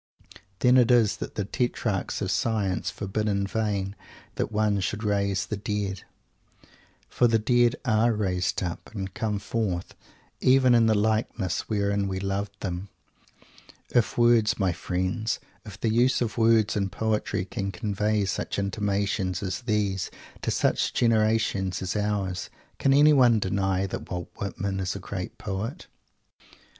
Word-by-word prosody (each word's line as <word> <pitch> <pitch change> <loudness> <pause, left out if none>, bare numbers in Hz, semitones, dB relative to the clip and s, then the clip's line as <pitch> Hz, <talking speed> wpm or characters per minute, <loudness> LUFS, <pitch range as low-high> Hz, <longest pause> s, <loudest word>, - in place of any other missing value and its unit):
Then 125 +1 +6
it 125 -1 +5
is 120 -4 +4
that - - -6
the 105 - -1
Tetrarchs 110 -3 -1
of - - -1
Science 105 -5 0
forbid 105 +2 -3
in 100 -1 0
vain 100 -1 -2 0.4
"that - - -2
one 105 -1 +1
should 105 +3 -2
raise 100 -2 0
the 105 - -4
Dead." 100 -2 -3 1.1
For 120 - +2
the 115 -1 +3
Dead 120 +2 +3
are 110 +1 +3
raised 95 -4 -1
up, 85 -1 -5
and 95 -2 -4
come 110 -1 -1
forth, 100 -4 -2 0.5
even 130 -1 +5
in 115 -1 +5
the 110 - +4
likeness 110 -3 0
wherein 100 -1 0
we 95 -1 -2
loved 100 +1 -3
them! 90 0 -4 1.0
If 120 -3 +2
words, 120 -2 +4
my 95 -3 +1
friends; 95 +6 -2 0.3
if 105 -2 -10
the 110 -1 0
use 125 +2 +3
of 115 -3 -2
words 115 -2 +3
in 100 -2 0
poetry 110 -3 -1
can 100 +1 -4
convey 105 +1 0
such 95 - -3
intimations 100 -1 -1
as 95 +3 -3
these 105 -5 -1 0.3
to - - -2
such - - +1
a - - -18
generation 110 -4 +2
as 95 +1 -3
ours, 100 -3 -1 0.3
can 135 - +3
anyone 135 -5 +6
deny 95 -1 0
that 95 - -6
Walt 90 -1 -5
Whitman 100 -1 -3
is 95 -1 -2
a - - -4
great 95 -1 -6
poet? 105 - -4
105 Hz, 150 wpm, -26 LUFS, 95-110 Hz, 1.1 s, Then